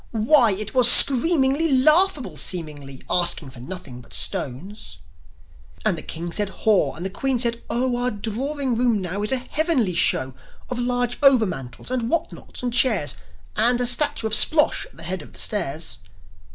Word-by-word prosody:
Why, 230 0 +2
it 210 +2 -5
was 250 -2 +8
screamingly 280 +2 +6
Laughable, 300 - +2
seemingly 145 -6 -4
Asking 170 -5 -1
for 130 - -13
nothing 130 -3 -8
but 115 - -11
stones! 145 - -2 0.9
And 210 -5 +1
the 160 - -7
King 170 +1 -7
said, 205 +2 -2
"Haw!" 210 0 -1
and 175 - -8
the - - -3
Queen 265 +5 -2
said, 235 -1 0
"Oh! 250 +1 -1
Our 245 +1 -2
drawing 250 +6 -4
room 235 -2 0
now 185 +2 -5
is 210 - -2
a 265 - +1
heavenly 260 - -2
show 130 -5 +1 0.4
Of 245 - -4
large 245 0 -2
overmantels, 220 - 0
and 240 -2 -3
whatnots, 335 -4 -5
and 245 -1 -3
chairs, 230 - +2 0.4
And 240 +3 +3
a 245 - +1
statue 245 0 +1
of 220 - -3
Splosh 300 +6 +2
at - - -23
the 165 - -8
head 180 +2 -5
of - - -14
the - - -9
stairs!" 160 -6 -2
230 Hz, 170 wpm, -21 LUFS, 180-255 Hz, 0.9 s, was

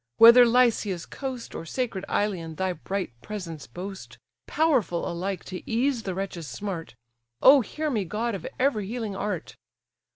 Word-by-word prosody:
whether 235 +2 +9
Lycia's 230 -7 +2
coast, 260 -4 -6
Or - - -5
sacred 195 +1 -3
Ilion, 175 -6 -1
thy 190 +1 -1
bright 190 0 -4
presence 170 -6 -7
boast, 190 +2 -8 0.3
Powerful 265 - +1
alike 185 +2 -3
to 185 -1 -6
ease 245 +2 +1
the 190 -4 -4
wretch's 185 -4 -4
smart; 165 - -5 0.5
O 275 +1 +9
hear 305 +7 -3
me! 215 -6 0
god 220 +6 -2
of 190 -5 -5
every 235 -7 +1
healing 225 -3 -4
art! 195 -4 -4
200 Hz, 150 wpm, -26 LUFS, 180-240 Hz, 0.5 s, whether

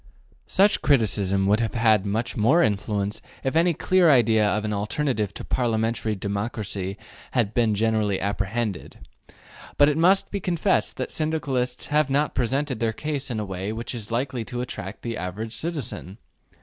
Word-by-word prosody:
Such 200 +2 +3
criticism 100 -7 +2
would 105 +3 +3
have 115 0 -2
had 110 -4 +3
more 115 +8 +2
influence 105 -1 -1 0.2
if 135 +3 -1
any 170 0 +3
clear 185 0 +3
idea 115 -6 +4
of 105 +1 0
an 105 - -1
alternative 105 0 -1
to - - -6
parliamentary 115 -2 0
democracy 100 -1 -4 0.4
had 115 -5 +1
been 115 -3 +2
generally 110 -2 +1
apprehended. 100 +1 -3 0.7
But 145 0 +6
it 150 +1 0
must 190 +4 +4
be 200 - -2
confessed 180 +1 0
that - - -3
Syndicalists 135 -6 -2
have 150 -2 +3
not 145 +2 +1
presented 130 +1 -1
their 115 0 0
case 145 +1 -4
in 115 -3 -2
a 105 - -2
way 95 +1 -4
which 115 +3 -4
is 110 -4 -6
likely 125 +1 -2
to 120 +3 -4
attract 105 -5 -6
the 115 -1 -3
average 105 +5 -5
citizen. 130 - -5
115 Hz, 160 wpm, -24 LUFS, 105-140 Hz, 0.7 s, But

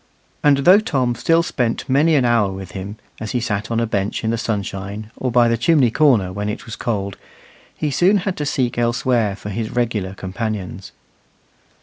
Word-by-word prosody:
And 145 -2 +5
though 185 +3 +8
Tom 130 - 0
still 165 +8 +2
spent 120 -8 -2
many 150 +5 +3
an 135 -4 +3
hour 115 -5 +2
with 95 -2 -8
him, 100 +3 -7 0.2
as 110 - -5
he 125 - +1
sat 110 -2 -2
on 115 0 0
a 115 - +1
bench 100 -1 -2
in 110 - 0
the - - +1
sunshine, 100 0 -4
or 130 - -2
by 120 0 +4
the 115 -1 +1
chimney 130 -1 +3
corner 115 -11 +3
when 105 +2 -3
it 105 - -5
was 115 - -7
cold, 100 -4 -3 0.6
he 150 -2 -1
soon 185 +8 +4
had 190 -3 -1
to 150 - -2
seek 125 -3 -1
elsewhere 120 -3 +1
for 100 +1 -8
his 110 +2 -3
regular 110 -6 -2
companions. 95 -1 -5
115 Hz, 195 wpm, -20 LUFS, 100-130 Hz, 0.6 s, though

